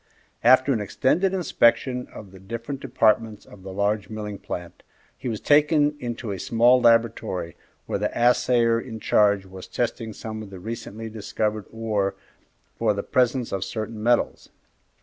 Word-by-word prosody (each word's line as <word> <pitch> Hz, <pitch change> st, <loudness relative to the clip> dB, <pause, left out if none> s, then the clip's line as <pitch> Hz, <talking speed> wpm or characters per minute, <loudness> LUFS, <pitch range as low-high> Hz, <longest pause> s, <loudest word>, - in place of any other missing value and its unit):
After 130 Hz, +3 st, +5 dB
an 110 Hz, -, -1 dB
extended 155 Hz, -, +1 dB
inspection 125 Hz, -8 st, +2 dB
of 100 Hz, -3 st, -11 dB
the 95 Hz, -, -13 dB
different 115 Hz, +7 st, -6 dB
departments 110 Hz, -4 st, +1 dB
of 100 Hz, -, -15 dB
the 95 Hz, 0 st, -8 dB
large 100 Hz, +2 st, -1 dB
milling 105 Hz, -2 st, -6 dB
plant, 90 Hz, -1 st, -7 dB, 0.3 s
he 125 Hz, -, -5 dB
was 110 Hz, -2 st, -3 dB
taken 150 Hz, 0 st, +3 dB
into 120 Hz, -3 st, -4 dB
a 95 Hz, -, -4 dB
small 120 Hz, +5 st, +4 dB
laboratory, 115 Hz, -7 st, +2 dB, 0.3 s
where -, -, -2 dB
the -, -, 0 dB
assayer 120 Hz, -1 st, +3 dB
in 115 Hz, -3 st, -8 dB
charge 100 Hz, -2 st, +3 dB
was 95 Hz, -1 st, -10 dB
testing 115 Hz, -2 st, -3 dB
some 110 Hz, +1 st, -7 dB
of 105 Hz, -, -9 dB
the 95 Hz, -2 st, -10 dB
recently 110 Hz, +1 st, -6 dB
discovered 110 Hz, -1 st, -3 dB
ore 105 Hz, -3 st, -1 dB, 0.6 s
for 110 Hz, -3 st, +2 dB
the 100 Hz, -, -3 dB
presence 125 Hz, -1 st, +1 dB
of 95 Hz, -1 st, -2 dB
certain 110 Hz, +2 st, -5 dB
metals. 120 Hz, +2 st, +1 dB
115 Hz, 155 wpm, -24 LUFS, 105-120 Hz, 0.6 s, After